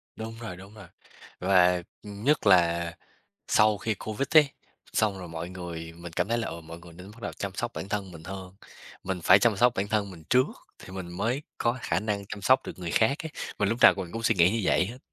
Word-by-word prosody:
Đúng 110 0 -6
rồi, 110 -7 -7
đúng 95 +3 -13
rồi, 105 -5 -12 0.5
và 90 -1 +4 0.2
nhất 105 +7 0
là, 85 -3 +4 0.6
sau 105 -1 +4
khi 110 +1 -1
Covid 110 +7 -4
ý, 155 - +10 0.5
xong 105 -3 +1
rồi 90 -2 -8
mọi 80 +1 -5
người 85 -3 -7
mình 85 -1 -9
cảm 90 +3 -1
thấy 115 +1 +1
là, 115 - -2
ờ, 85 +1 -6
mọi 80 +1 -10
người 85 0 -14
nên 90 +4 -11
bắt 115 +1 -16
đầu 105 - -4
chăm 100 -1 -5
sóc 120 +3 -3
bản 95 - -5
thân 100 -3 -3
mình 80 -1 -11
hơn. 95 0 -8 0.5
Mình 95 -2 -3
phải - - +7
chăm 115 -4 +3
sóc 120 +3 +4
bản 100 +1 -1
thân 105 -2 0
mình 80 -4 -12
trước, 130 +1 +5 0.3
thì - - -13
mình 95 -2 -6
mới 120 +8 -1 0.2
có 120 +2 0
khả 85 +2 0
năng 105 -1 -3
chăm 100 0 -8
sóc 130 +6 +4
được - - -7
người 90 -2 -4
khác 125 - +2
ấy, - - -8 0.3
mà 100 - +2
lúc 115 +4 0
nào - - +9
mình 90 -3 -5
cũng 115 - -4
suy 115 - +3
nghĩ 90 0 +5
như 115 - 0
vậy 95 - +3
hết. 120 +4 -8
100 Hz, 240 wpm, -27 LUFS, 90-110 Hz, 0.6 s, ý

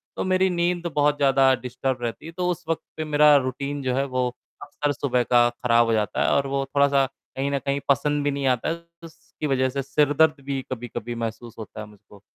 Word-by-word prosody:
तो - - -2
मेरी 185 0 +2
नींद 175 0 0
बहुत 145 0 +3
ज़्यादा 135 -1 +4
डिस्टर्ब 130 0 -3
रहती 115 +5 -4
है। 165 - -7
तो 180 +1 -2
उस 170 - -5
वक़्त 165 - 0 0.2
पे 155 - -2
मेरा 150 0 +5
रूटीन 140 +2 -3
जो 130 -1 0
है 135 +1 +1
वो 130 -1 -1 0.3
अक्सर 145 -1 -2
सुबह 125 -3 0
का 120 0 +4
ख़राब 120 -1 +2
हो 115 - +1
जाता 105 -1 0
है - - +2
और 140 0 +2
वो 135 0 -1
थोड़ा-सा 140 0 +3 0.3
कहीं 135 +1 -1
न 140 - 0
कहीं 140 +2 -1
पसंद 145 +1 +2
भी 145 - +1
नहीं 140 -1 -2
आता 125 +2 +1
है। 170 +1 -4 0.2
उसकी 155 -1 -8
वजह 130 -2 +1
से 140 +1 -3
सिरदर्द 145 +1 +2
भी 135 -1 -2
कभी-कभी 120 -1 -5
महसूस 115 0 -5
होता 110 - -9
है - - -7
मुझको। 105 -1 -18
140 Hz, 220 wpm, -24 LUFS, 125-145 Hz, 0.3 s, मेरा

